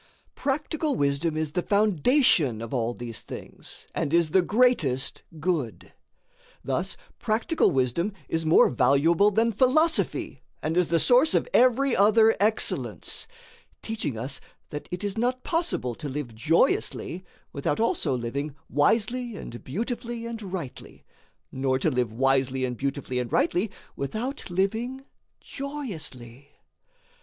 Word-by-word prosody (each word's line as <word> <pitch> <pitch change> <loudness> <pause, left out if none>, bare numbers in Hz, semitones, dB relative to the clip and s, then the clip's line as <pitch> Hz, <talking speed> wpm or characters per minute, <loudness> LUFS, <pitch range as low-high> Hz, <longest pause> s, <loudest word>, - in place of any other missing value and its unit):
Practical 300 +2 -1
wisdom 145 +3 0
is 155 -1 -1
the 180 - 0
foundation 200 - +3
of 115 +2 -6
all 120 -1 -1
these 120 -2 -6
things - - -10
and 140 - -1
is 170 -3 +3
the 190 - +5
greatest 180 - +1 0.2
good. 150 - -2 0.7
Thus 170 +9 -2 0.2
practical 225 +8 +1
wisdom 135 - 0 0.2
is 165 0 -1
more 160 0 +5
valuable 140 - +4
than 225 +3 +2
philosophy 275 +9 +1 0.2
and 160 +1 -1
is 180 -1 +3
the 170 - +2
source 250 - +5
of - - +2
every 255 +1 +4
other 220 +3 +5
excellence 215 +2 0
[note], 475 0 -24
teaching 220 - -3
us 135 +4 -3 0.3
that 150 - -7
it 180 +3 -4
is 205 +1 -2
not 255 +2 0
possible 330 - -1
to 145 +5 -6
live 135 -4 -5
joyously 165 +6 +1 0.3
without 140 +1 -1
also 225 - +1
living 140 +5 -4 0.2
wisely 230 - +1
and 120 -10 -8
beautifully 235 - -4
and 230 -1 -5
rightly, 185 -9 -7 0.5
nor 130 0 0
to 155 +4 +1
live 125 -4 0
wisely 135 +1 +1
and 125 -1 -3
beautifully 135 0 -2
and 125 -2 -4
rightly 190 +5 +1 0.3
without 225 - -4
living 225 +9 -1 0.4
joyously. 155 - -6
170 Hz, 130 wpm, -26 LUFS, -, 0.7 s, the